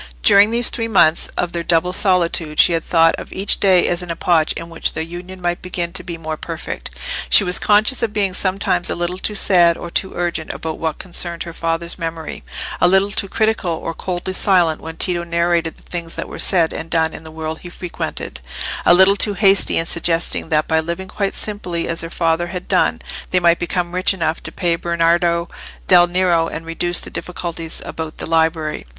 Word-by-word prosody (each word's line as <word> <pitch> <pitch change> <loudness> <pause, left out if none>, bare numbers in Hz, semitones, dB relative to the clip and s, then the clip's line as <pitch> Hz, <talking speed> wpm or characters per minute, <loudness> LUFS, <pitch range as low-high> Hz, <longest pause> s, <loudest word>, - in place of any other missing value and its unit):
During 200 +1 +7
these 235 +1 +3
three 230 -1 -2
months 170 -7 +3
of 175 - -1
their 170 - -2
double 170 +1 +1
solitude 170 -5 +1
she 175 - +6
had 165 - -1
thought 165 -1 +3
of - - -10
each 195 +2 0
day 185 -3 +4
as 175 +1 0
an 180 - -8
epoch 165 -1 +1
in 165 - -7
which 165 -1 -1
their 160 - -3
union 175 +3 -9
might 175 -1 -2
begin 175 -1 -4
to - - +1
be 170 -2 -7
more 160 -1 -5
perfect. - - -6 0.4
She 65 - +7
was 180 0 +2
conscious 215 +5 +3
of 230 -2 0
being 200 -3 -1
sometimes 185 -2 +1
a - - -1
little 175 +1 -3
too 210 - -2
sad 175 -4 +4
or 170 - -8
too 190 - -1
urgent 170 -2 -3
about 160 -1 -6
what 160 -1 -2
concerned 175 -2 -3
her 170 - -9
father's 165 +2 -3
memory—a 160 - -3
little 190 +2 +3
too 200 -1 -1
critical 220 -4 0
or 165 +1 -5
coldly 180 +2 -4
silent 180 -5 +2
when 160 0 -8
Tito 175 -2 -1
narrated 170 -1 0
the - - -21
things 170 -2 -6
that - - -4
were - - -9
said 170 -4 +3
and 160 - -6
done 160 -1 +1
in - - -9
the 160 - -10
world 160 0 -6
he 175 - -10
frequented—a 170 - -3
little 190 +2 +6
too 205 0 +2
hasty 195 0 +5
in 165 - +1
suggesting 170 -1 0
that 155 -2 +1
by 160 0 +2
living 170 +4 -4
quite 200 -2 -2
simply 180 -5 -3
as 165 - -1
her 165 - -6
father 165 0 0
had 180 +1 -7
done, - - +2 0.3
they 185 - +2
might 170 -1 +3
become 175 0 -2
rich 185 +2 +1
enough 160 -2 -2
to - - -7
pay 170 -2 0
Bernardo 170 0 +1 0.4
del 175 -1 +6
Nero, 175 -2 +1
and 165 0 -6
reduce 175 +1 0
the - - -6
difficulties 170 -2 -5
about 160 -1 -6
the - - -3
library. 160 - 0
170 Hz, 205 wpm, -18 LUFS, 165-185 Hz, 0.4 s, During